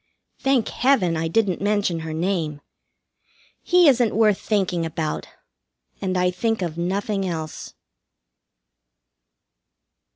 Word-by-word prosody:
Thank 270 -4 +1
Heaven, 240 -10 +2
I 165 +1 -1
didn't 190 0 0
mention 205 -4 0
her 160 0 -5
name! 160 -3 -2 1.0
He 355 -2 +4
isn't 245 -6 +3
worth 215 -3 +3
thinking 185 -5 0
about, 160 -1 -3 0.7
and 185 -1 -1
I 180 0 +2
think 225 +2 -1
of 165 -3 -3
nothing 195 +4 -1
else. 160 -3 -6
185 Hz, 105 wpm, -23 LUFS, 165-215 Hz, 1.0 s, He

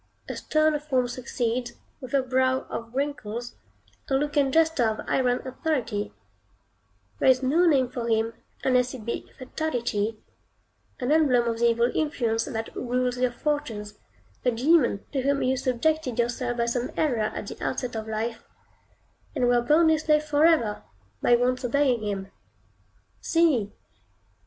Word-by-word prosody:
A - - -4
sterner 310 -1 +1
form 265 -4 0
succeeds, 240 -1 -3 0.3
with 255 +1 -4
a 270 - +3
brow 260 0 +1
of 230 0 -5
wrinkles, 245 -5 -3 0.6
a 270 - +2
look 295 +2 -1
and 280 -2 +3
gesture 320 -5 +3
of 215 - -5
iron 250 0 +1
authority; 250 -7 -2 1.1
there - - +4
is 260 0 +4
no 325 +7 +3
name 270 -5 +4
for 240 -1 -5
him 225 0 +1 0.3
unless 250 -1 +2
it 225 -4 -10
be 235 - -4
Fatality, 240 -6 -2 0.8
an 250 +2 -1
emblem 265 -7 +4
of 230 -1 -1
the 235 0 +4
evil 235 +1 +2
influence 235 -7 0
that 225 -4 -5
rules 250 0 -1
your 255 0 +2
fortunes; 240 -6 -3 0.4
a 250 - +3
demon 250 -2 +2
to 275 - -1
whom 280 +1 +1
you 260 +1 +2
subjected 260 +1 0
yourself 240 +1 -1
by 235 - +1
some 240 +1 -1
error 275 -7 +1 0.2
at - - -4
the - - -8
outset 250 -2 -2
of 220 0 -4
life, 225 +1 -3 0.9
and 245 - +2
were 245 0 +4
bound 315 +6 +4
his 315 -1 +2
slave 300 -1 +3
forever, 300 -7 +3 0.4
by 240 - +5
once 250 +1 0
obeying 250 -1 +2
him. 195 -2 -4 0.9
See! 295 -12 +2
250 Hz, 150 wpm, -26 LUFS, 235-285 Hz, 1.1 s, by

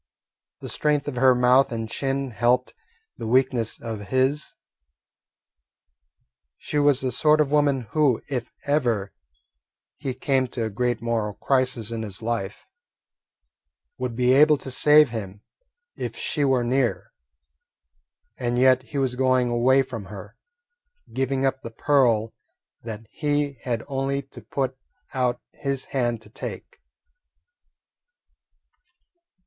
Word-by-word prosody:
The - - -6
strength 150 -1 0
of 135 -4 -4
her 130 0 +5
mouth 125 +2 +4
and 115 -1 -3
chin 135 +2 -2
helped 120 +3 +1 0.4
the 115 - -5
weakness 125 -2 +1
of 110 -3 -6
his. 130 +6 0 2.0
She 150 - -2
was 145 -2 +4
the 130 -1 -1
sort 150 +5 +3
of 145 -2 +2
woman 145 -3 +3
who, 145 -7 +3
if 125 -4 -3 0.2
ever 120 -9 0 0.8
he 130 -2 -4
came 135 -2 +1
to 120 -1 -4
a 110 - -4
great 120 +2 -1
moral 110 -3 -1
crisis 125 -4 0
in 115 -1 -3
his 105 -1 -6
life, 110 -4 -3 1.3
would 125 -2 -3
be 125 +1 +3
able 150 +2 +6
to 135 - -6
save 150 +2 +6
him 105 -3 -6 0.5
if - - -5
she 150 - -1
were 130 -3 +2
near. 125 0 0 1.3
And 120 -1 -1
yet 130 0 +5
he 130 +3 -8
was 135 -2 +1
going 130 -1 +2
away 130 +3 +4
from 115 -6 -7
her, 95 -1 -10 0.8
giving 135 0 0
up 135 0 0
the - - -7
pearl 115 -3 +2 0.5
that 115 -1 -7
he 145 -3 -1
had 115 -3 -2
only 140 0 -2
to 130 -2 -14
put 130 +4 -3 0.4
out 125 -2 0
his 140 -2 -3
hand 120 -4 0
to 105 - -16
take. - - -8
125 Hz, 130 wpm, -24 LUFS, 115-135 Hz, 2.0 s, able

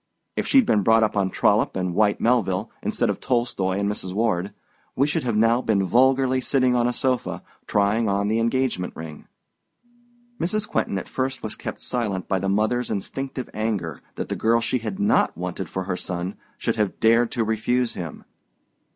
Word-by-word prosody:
If - - -1
she'd 265 -3 +5
been 105 - +3
brought 115 +3 +4
up 110 - 0
on 100 -2 +1
Trollope - - +2
and 90 -1 -1
Whyte 105 +2 +2
Melville, 110 -6 +1
instead - - 0
of - - -6
Tolstoi 120 -7 0
and 100 - 0
Mrs. 95 -3 -4
Ward, 100 -4 0 0.4
we 135 - +3
should 150 - -1
have 120 -4 0
now 115 +3 +4
been 105 -5 +1
vulgarly 130 +3 +3
sitting 130 -1 +2
on 120 -1 +2
a - - +1
sofa, 125 -1 -1 0.2
trying 105 +2 +2
on 100 +1 +1
the 110 +2 +1
engagement 115 -5 0
ring." 80 -2 -9 1.1
Mrs. 210 +5 -1
Quentin 100 - -1
at - - -5
first 130 0 -3
was 110 - -4
kept - - -6
silent 105 -7 -2
by 95 - +1
the 95 +1 -1
mother's 110 +5 +1
instinctive 130 +5 -4
anger 100 - -2
that - - -4
the - - -1
girl 115 +1 +3
she 125 +2 0
has 110 -4 -5
not 100 - +2
wanted 90 0 -4
for 95 - -3
her 90 0 -2
son 90 +1 -4 0.2
should - - -1
have 105 -3 -1
dared 115 +1 +4
to 120 - +1
refuse 115 +3 0
him. 85 -3 -7
110 Hz, 185 wpm, -24 LUFS, 95-125 Hz, 1.1 s, she'd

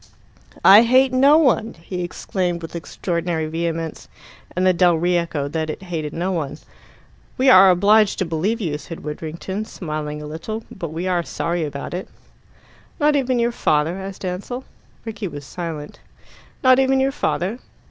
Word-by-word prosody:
"I 200 +3 +10
hate 255 +2 +4
no 275 +4 +6
one," 255 -7 +2
he 180 +2 -5
exclaimed 175 0 -3
with 165 - -8
extraordinary 170 -1 -2
vehemence, 165 0 -3 0.5
and 185 +1 +1
the 185 - +5
dell 175 -1 +4
re 175 +2 +1
echoed 150 -4 -2
that 160 -1 -1
it 155 - -6
hated 160 -5 -4
no 175 +4 -2
one. 150 -5 -3 0.8
"We 260 +1 +5
are 190 -3 +8
obliged 205 +3 +4
to 190 - 0
believe 175 +8 -1
you," 155 -8 -2
said 165 +1 -9
Widdrington, 160 +6 -5
smiling 150 -6 -5
a 150 - -7
little 170 +9 -6
"but 170 -4 -6
we 170 +3 -3
are 180 -2 +1
sorry 170 0 -2
about 140 0 -5
it." 180 +2 -4 0.9
"Not 300 -1 +3
even 260 -3 +1
your 235 0 +1
father?" 160 -4 0
asked 190 0 -7
Ansell. 200 +8 -4 0.4
Rickie 220 -2 -4
was 145 -4 -8
silent. 160 -2 -6 0.6
"Not 255 0 +6
even 265 0 +3
your 270 +1 +2
father?" 225 -5 -2
180 Hz, 165 wpm, -21 LUFS, 160-220 Hz, 0.9 s, I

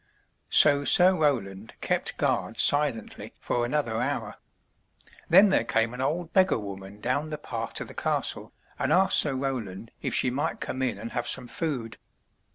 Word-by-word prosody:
So 145 0 +6
Sir 185 +5 +5
Roland 115 - -2
kept - - -2
guard - - -2
silently 145 -7 +2
for 120 - -2
another 120 -5 -2
hour. 125 -5 -4 0.9
Then 195 +5 +6
there 190 - +2
came 115 +1 -1
an 125 - -6
old 160 +5 -3
beggar 190 -1 +3
woman 100 -1 -9
down 145 +7 -2
the 155 - -5
path - - -7
to - - -3
the - - -13
castle, - - -2 0.3
and - - -1
asked 190 +1 +5
Sir 145 -3 0
Roland 115 -6 -5
if - - -2
she 130 - +2
might 140 +4 -3
come 130 - -5
in 130 -2 -2
and 115 - -8
have 120 0 -4
some 120 - -1
food. 130 -7 -4
130 Hz, 165 wpm, -26 LUFS, 115-150 Hz, 0.9 s, So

